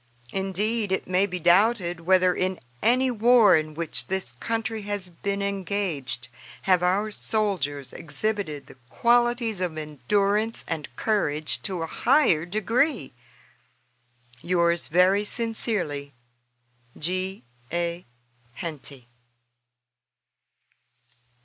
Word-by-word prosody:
Indeed, 200 +3 -1
it 190 - 0
may 185 +2 +2
be 180 -2 -4
doubted 175 0 +3
whether 185 +1 +3
in 185 0 -1 0.2
any 255 +2 +3
war 235 -2 +6
in 155 -1 -1
which 165 0 -2
this 190 -9 -2
country 225 -1 -2
has 205 -2 -2
been 200 +3 -3
engaged 185 -10 -2 0.4
have 185 -2 +3
our 195 +4 +1
soldiers 185 - -1
exhibited 160 -1 -3
the - - -16
qualities 240 - +2
of 170 -4 -2
endurance 200 - 0
and 155 -4 -4
courage 155 -9 0
to 185 -5 -3
a - - -1
higher 180 - +2
degree. 225 - 0 1.3
Yours 170 -1 +1
very 185 +5 +4
sincerely, 205 - -1 0.8
G. 185 +1 -3 0.3
A. 170 +1 -2 0.5
HENTY. 140 -6 -7
185 Hz, 100 wpm, -25 LUFS, 165-215 Hz, 1.3 s, war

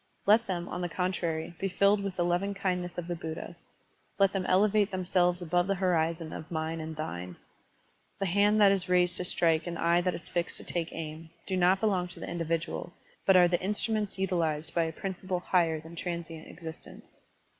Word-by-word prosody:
Let 220 +3 +5
them, 175 -2 -2
on 180 - -4
the 175 - -2
contrary, 170 -2 -2
be 195 - 0
filled 200 +2 +3
with 195 -2 -3
the 175 - +1
lovingkindness 180 -1 -1
of 175 - -3
the 175 - -2
Buddha; 160 -1 -6 0.6
let 195 -1 +4
them 190 -2 -1
elevate 205 +2 +3
themselves 180 -1 +1
above 175 +2 +1
the 195 - +1
horizon 165 -3 0
of 155 - -7
the - - -9
mine 160 +1 -2
and 160 0 -6
thine. 90 - -5 0.8
The 195 - -1
hand 205 +3 +3
that 200 -2 +7
is 190 -2 -1
raised 180 0 +3
to 180 - -2
strike 165 -2 +2
and 170 -1 -4
the - - -3
eye 170 +1 +4
that 180 0 0
is - - -9
fixed 170 -1 0
to - - -2
take 170 -2 0
aim, 160 0 -7 0.2
do 190 - -2
not 185 +1 +4
belong 190 -5 +1
to 175 - -9
the - - -6
individual, 165 +1 -3 0.3
but 195 -1 +7
are 180 -1 +7
the 175 0 0
instruments 210 +1 0
utilized 165 -5 0
by 170 -1 +2
a 160 - -3
principle 185 +1 -4
higher 170 -3 +1
than 160 +2 -11
transient 170 -2 -5
existence. 160 -1 -10
175 Hz, 200 wpm, -29 LUFS, 165-190 Hz, 0.8 s, that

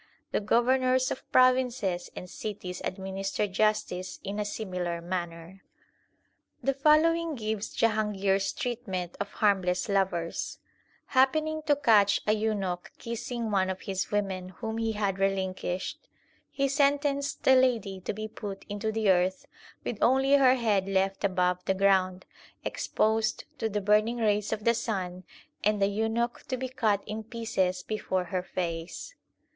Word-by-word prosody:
The - - +1
governors 255 +4 +2
of - - -6
provinces 250 -8 +3
and 180 - -7
cities 185 -2 -6
administer 195 +2 -2
justice 195 -2 0
in 200 +1 -4
a 210 - -1
similar 180 -5 -3
manner. 175 +1 -5 1.0
The 275 +2 +2
following 315 +3 +3
gives 215 -2 -3
Jahangir 210 -3 +2
s 195 0 -1
treatment 195 -8 -4
of 200 - -2
harmless 190 -2 +2
lovers: 190 -4 -1 0.5
Happening 310 +4 +2
to 290 - +5
catch 210 -7 +4
a 210 - +3
eunuch 205 -5 -2
kissing 235 0 -4
one 190 -2 +2
of 190 - -4
his 190 -2 -3
women 190 -3 -2
whom 220 +3 -5
he 225 -1 0
had 200 -2 -1
relinquished, 190 -2 -2 0.4
he 275 0 0
sentenced 280 0 +1
the 265 - +6
lady 235 -7 +2
to - - -2
be 215 +1 -5
put 205 -2 -7
into 205 +2 -2
the 215 -2 +3
earth, 185 +1 +1 0.4
with 220 - -4
only 265 +3 +4
her 265 -2 +6
head 210 -6 +1
left 195 0 0
above 180 -2 +1
the 190 - +1
ground, 190 -1 +2 0.4
exposed 220 0 0 0.2
to 225 - 0
the 210 0 -1
burning 210 +4 +3
rays 210 -3 +1
of 215 -1 -2
the 235 - +4
sun, 185 -6 -3 0.4
and 210 0 +2
the 195 - +4
eunuch 225 +4 -1
to 255 - -2
be 260 +1 -4
cut 220 -6 +1
in 215 +1 -5
pieces 195 -6 -1
before 190 -3 -1
her 185 - +1
face. 170 - -4
210 Hz, 145 wpm, -28 LUFS, 190-235 Hz, 1.0 s, the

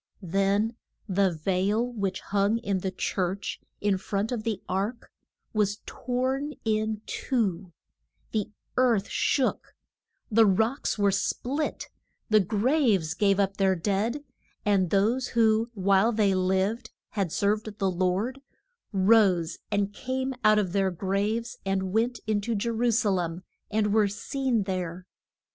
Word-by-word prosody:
Then 195 +5 +1 0.3
the 195 -1 +2
veil 190 +7 0
which 195 -4 -2
hung 200 +2 +1
in 200 -4 -1
the 190 - -2
church, 190 +1 -2 0.2
in 200 -2 +1
front 205 +3 -2
of 240 -3 -2
the 220 -2 -2
ark, 205 +6 -3 0.4
was 210 -1 0
torn 260 +4 -2
in 215 0 0
two; 195 -8 -1 0.6
the 215 -3 -1 0.3
earth 235 -6 +3
shook; 260 -2 0 0.6
the 225 0 +6
rocks 220 +9 +1
were 200 -1 +3
split; 265 +9 -2 0.4
the 215 - +7
graves 210 - +2
gave 200 +1 +2
up 195 0 +1
their 190 -1 +3
dead, 210 - -1 0.4
and 195 -4 +2
those 225 +7 +2
who, 225 0 +2
while 200 +3 +3
they 210 -3 +2
lived, 190 +5 0 0.2
had 195 -6 -2
served 210 +2 0
the 195 -3 +1
Lord, 190 +9 -1 0.5
rose 190 -4 +3
and 205 -1 0
came 260 +3 -2
out 215 0 +6
of 190 -4 0
their 195 -1 +2
graves 200 +6 -2
and 190 -1 -1
went 235 +2 +1
in 215 -1 0
to 230 +2 -2
Je 230 +3 -1
ru 235 +1 +1
sa 225 -2 +2
lem 175 -1 -2 0.3
and 210 -1 +1
were 215 -2 +4
seen 235 +3 -1
there. 180 -2 -4
205 Hz, 140 wpm, -27 LUFS, 190-225 Hz, 0.6 s, the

